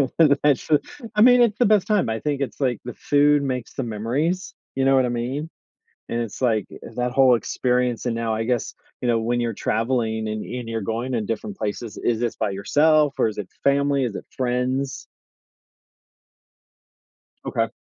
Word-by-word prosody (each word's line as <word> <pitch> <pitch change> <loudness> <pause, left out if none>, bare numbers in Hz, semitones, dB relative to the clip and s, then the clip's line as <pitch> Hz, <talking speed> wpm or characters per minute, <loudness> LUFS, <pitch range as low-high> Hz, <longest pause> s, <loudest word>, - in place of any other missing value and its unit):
That's 145 -3 +4
so 150 -2 +3 0.4
I 210 - +3
mean, 245 +1 +7
it's 230 -3 +3
the 245 - +3
best 210 -2 +3
time. 210 - +2
I 110 0 -2
think 145 0 -2
it's, 140 - -4
like, 125 -5 0
the 125 - -5
food 145 +2 +3
makes 130 -3 -3
the 135 - -3
memories. 125 - -2 0.2
You 135 0 +1
know 135 - +5
what 130 -1 +4
I - - -1
mean? 130 +6 -3 0.6
And 120 - -1
it's 115 +2 -5
like, 110 -5 +2
uh, - - -10
that 125 0 -1
whole 130 -2 +5
experience 125 0 0
and 120 - 0
now 115 -1 -1
I 110 - -1
guess, 120 0 -1 0.3
you 125 - -2
know, 115 -1 +2
when 120 +2 0
you're 120 -1 -1
traveling 110 0 -1
and 110 0 -3
and 125 -2 -6
you're 115 -1 -2
going 115 +5 -3
to 120 - 0
different 105 -1 -4
places, 105 +1 -4
is 115 -2 0
this 120 -1 -1
by - - -1
yourself 145 +9 +3
or - - +2
is 105 - -7
it - - -1
with 95 - -20
family? 140 0 +2
Is 115 -5 -3
it - - -7
friends? 130 +2 -1 2.4
Okay. - - 0
125 Hz, 195 wpm, -23 LUFS, 115-140 Hz, 2.4 s, mean